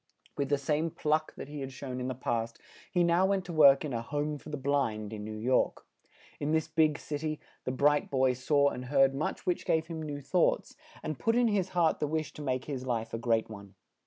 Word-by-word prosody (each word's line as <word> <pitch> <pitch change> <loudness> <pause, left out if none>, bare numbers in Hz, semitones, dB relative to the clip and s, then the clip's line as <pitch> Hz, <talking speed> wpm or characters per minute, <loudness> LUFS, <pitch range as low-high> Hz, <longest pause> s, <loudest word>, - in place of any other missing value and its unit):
With 140 -1 -1
the 145 - +3
same 150 +4 0
pluck 155 0 -1
that - - -7
he 145 0 -7
had 135 -1 -5
shown 130 -1 -6
in 125 - -2
the 130 - -3
past, 115 -2 -2 0.3
he 180 -2 +3
now 170 +2 +4
went 195 -2 0
to 175 - -6
work 140 -2 +6
in 140 - -4
a 115 - -1
"Home 145 +4 -2
for - - -11
the 150 - -3
Blind," 125 -7 -1
in 105 -1 -6
New 110 0 -6
York. 125 +4 +1 0.5
In 150 +1 -1
this 160 -1 +1
big 155 -2 +2
cit 145 -1 -5
y, 155 -1 -2 0.3
the - - -1
bright 145 +3 +2
boy 130 -1 +3
saw 140 +3 +3
and 125 - -6
heard 135 0 +4
much 140 +3 -3
which 180 - 0
gave 160 -1 +1
him 165 -1 -6
new 145 -2 -4
thoughts, 145 +6 +1 0.3
and 155 -3 -4
put 225 0 +2
in 240 -1 +4
his 195 -3 0
heart 165 -2 +3
the 150 - 0
wish 155 0 -2
to - - -9
make 130 -2 -2
his 135 -4 -4
life 115 -2 -2
a 115 - -2
great 115 -1 +1
one. 100 -3 -11
145 Hz, 240 wpm, -30 LUFS, 130-155 Hz, 0.5 s, work